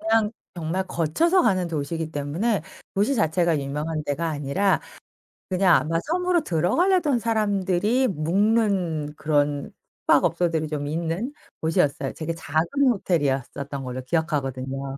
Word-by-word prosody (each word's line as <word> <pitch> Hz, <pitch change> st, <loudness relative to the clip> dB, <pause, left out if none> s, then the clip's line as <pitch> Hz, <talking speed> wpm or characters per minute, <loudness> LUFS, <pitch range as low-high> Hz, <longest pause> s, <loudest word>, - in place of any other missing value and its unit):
그냥 220 Hz, 0 st, +2 dB, 0.2 s
정말 175 Hz, +3 st, -2 dB
거쳐서 325 Hz, -, +2 dB
가는 185 Hz, -6 st, +2 dB
도시이기 160 Hz, +1 st, -3 dB
때문에 155 Hz, +7 st, -1 dB, 0.3 s
도시 210 Hz, +8 st, +2 dB
자체가 170 Hz, -, +2 dB
유명한 150 Hz, +3 st, -3 dB
데가 155 Hz, +4 st, -1 dB
아니라 155 Hz, +7 st, +1 dB, 0.7 s
그냥 185 Hz, -1 st, +4 dB
아마 165 Hz, +2 st, +1 dB
섬으로 355 Hz, +1 st, +1 dB
들어가려던 285 Hz, -, +2 dB
사람들이 215 Hz, +2 st, +1 dB
묵는 180 Hz, -3 st, +1 dB
그런 145 Hz, -2 st, 0 dB, 0.3 s
숙박업소들이 165 Hz, -2 st, +2 dB
좀 145 Hz, -1 st, -3 dB
있는 170 Hz, -, -2 dB, 0.3 s
곳이었어요. 145 Hz, -4 st, +1 dB
되게 165 Hz, +1 st, -4 dB
작은 160 Hz, 0 st, 0 dB, 0.3 s
호텔이었던 140 Hz, -, -1 dB
걸로 130 Hz, 0 st, -5 dB
기억하거든요. 135 Hz, -3 st, -2 dB
165 Hz, 320 characters per minute, -24 LUFS, 150-205 Hz, 0.7 s, 그냥